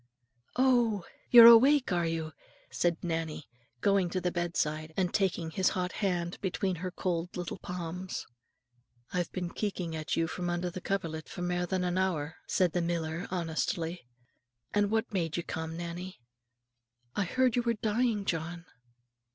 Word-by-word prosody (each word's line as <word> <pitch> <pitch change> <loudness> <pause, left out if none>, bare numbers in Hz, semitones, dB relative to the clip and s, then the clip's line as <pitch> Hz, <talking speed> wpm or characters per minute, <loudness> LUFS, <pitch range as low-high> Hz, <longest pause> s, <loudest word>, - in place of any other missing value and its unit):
"Oh! 240 -7 +3 0.2
you're 235 -2 +11
awake, 255 +4 +8
are 175 -2 +1
you?" 160 -1 -3 0.4
said 170 -1 +1
Nannie, 160 -3 -3 0.3
going 195 -3 +3
to 185 - -1
the 180 0 -1
bedside, 160 -3 -2
and 185 -2 +1
taking 180 -5 0
his 185 +3 +2
hot 180 0 -1
hand 175 -4 -2
between 190 -1 -1
her 185 +2 -3
cold 175 -1 -3
little 175 -1 -4
palms. 180 +1 -5 0.9
"I've 180 -1 -1
been 180 -2 -3
keeking 185 -5 -3
at 155 0 -2
you 165 - +2
from 175 +2 -3
under 175 +1 -1
the 185 - -7
coverlit 165 -6 -3
for 180 - -5
mair 175 0 0
than 185 0 0
an 180 +1 0
hour," 160 -4 -1
said 180 -3 +2
the 175 - +1
miller, 170 0 -2
honestly. 165 -3 -2 0.7
"And 205 -1 +3
what 220 0 0
made 170 -4 -1
ye 175 - -2
come, 160 0 -5
Nannie?" 175 +2 -6 1.0
"I 205 - +1
heard 255 +5 +2
you 245 - +3
were 235 -1 0
dying, 215 -1 0
John." 170 0 -3
180 Hz, 160 wpm, -30 LUFS, 165-195 Hz, 1.0 s, you're